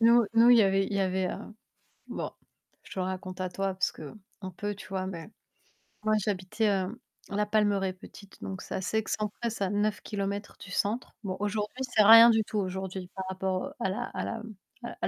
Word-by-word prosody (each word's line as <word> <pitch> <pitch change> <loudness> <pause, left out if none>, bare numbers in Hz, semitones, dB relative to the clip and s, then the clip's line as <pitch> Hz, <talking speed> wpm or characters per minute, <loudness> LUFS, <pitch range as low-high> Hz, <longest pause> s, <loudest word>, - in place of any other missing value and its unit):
Nous 235 0 +6
nous, 230 +1 +7
il 245 - +9
y - - +7
avait 195 0 +3
il - - -6
y 200 - +1
avait, 190 0 +1
heu - - -4 0.7
bon, - - -4 0.5
je - - -11
te - - -4
raconte 185 0 -4
à 185 - -1
toi 195 +1 -2
parce 190 0 0
qu'on 190 +4 -10
peut, 205 +3 -4
tu 205 - -11
vois? 190 -1 -2
Mais, 170 -1 -7 0.7
moi, 215 0 +3
j'habitais, 205 +2 0
heu, 195 +3 -1 0.3
La 210 +1 0
Palmeraie, 205 -3 +2
petite, 195 +1 -14
donc 190 -1 -5
c'est - - -6
assez 190 +3 -1
excentré, 215 +1 -2
c'est 215 -3 -3
à - - -1
9 205 +1 0
kilomètres 200 0 -4
du 180 - -10
centre. 215 +7 -1
Bon, 185 -2 -3
aujourd'hui, 210 +5 -2
c'est 245 -4 +3
rien 230 +2 +10
du 220 -1 +4
tout 215 - -4
aujourd'hui, 190 -1 -4
par 190 -1 -4
rapport, 190 0 -1
heu, - - -7
à - - 0
la 205 +6 -2
à - - -2
la - - -3
m 225 0 -8 0.5
à - - +1
200 Hz, 210 wpm, -29 LUFS, 190-215 Hz, 0.7 s, rien